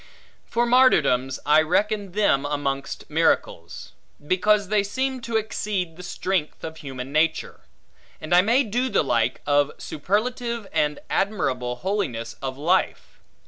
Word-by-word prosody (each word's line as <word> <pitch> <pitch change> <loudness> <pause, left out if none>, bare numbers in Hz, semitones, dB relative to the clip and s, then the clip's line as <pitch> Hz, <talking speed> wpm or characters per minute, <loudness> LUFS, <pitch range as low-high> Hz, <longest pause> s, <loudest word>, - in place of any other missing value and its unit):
For 240 0 +1
martyrdoms, 155 - +3
I 150 +1 +5
reckon 200 +4 0
them 185 -10 +2
amongst 145 -1 -3
miracles; - - -1 0.3
because 200 +4 +2
they 210 -1 +3
seem 260 +5 -2
to 230 -1 -1
exceed 205 -5 -3
the 180 - -10
strength 180 -2 -3
of 160 0 -6
human 135 -3 -7
nature: 155 +2 0 0.6
and 155 +2 -3
I 180 - +7
may 235 +8 +3
do 245 +3 -1
the 200 - +2
like, 120 -2 0
of 145 0 +2
superlative 235 - -2
and 150 -2 0
admirable 130 - -1
holiness 125 - -3
of 135 -1 -4
life. 175 +6 0
180 Hz, 135 wpm, -24 LUFS, 145-215 Hz, 0.6 s, I